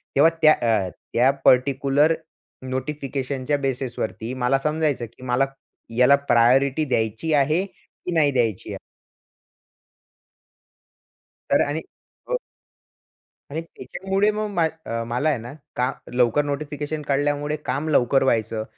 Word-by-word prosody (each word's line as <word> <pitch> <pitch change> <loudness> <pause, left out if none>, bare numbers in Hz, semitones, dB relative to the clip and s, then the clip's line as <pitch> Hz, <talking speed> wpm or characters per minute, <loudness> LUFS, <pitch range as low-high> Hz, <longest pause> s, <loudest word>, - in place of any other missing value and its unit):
तेव्हा 150 +4 +6
त्या 155 -1 +8
अ, 110 -6 +1 0.2
त्या 125 +3 +4
पार्टिक्युलर 140 +4 +4 0.6
नोटिफिकेशनच्या 135 0 -2
बेसिसवरती 130 -3 -3
मला 130 +2 +3
समजायचं 150 -3 0
की - - -14
मला 130 +2 +2 0.5
याला 125 +3 +6
प्रायोरिटी 135 +2 +3
द्यायची 115 +4 -1
आहे, 150 +6 +2
की 185 -2 -11
नाही 150 -3 +4
द्यायची 115 -7 -1
आहे. - - -5 2.7
तर - - +4
आणि 155 +3 -2 0.5
हो. - - +1 1.1
आणि 155 +3 -3
त्याच्यामुळे 195 +4 -2
मग 215 0 -2
मा 175 -3 +2 0.2
अ, 115 0 -3
मला 125 +6 0
आहे 145 - +1
ना 120 +3 -8 0.2
का, 125 +1 +1 0.2
लवकर 125 +3 +3
नोटिफिकेशन 150 +1 -4
कळल्यामुळे 145 +1 0
काम 150 +4 -2
लवकर 135 -2 +3
व्हायचं 110 -3 0
140 Hz, 120 wpm, -23 LUFS, 125-150 Hz, 2.7 s, त्या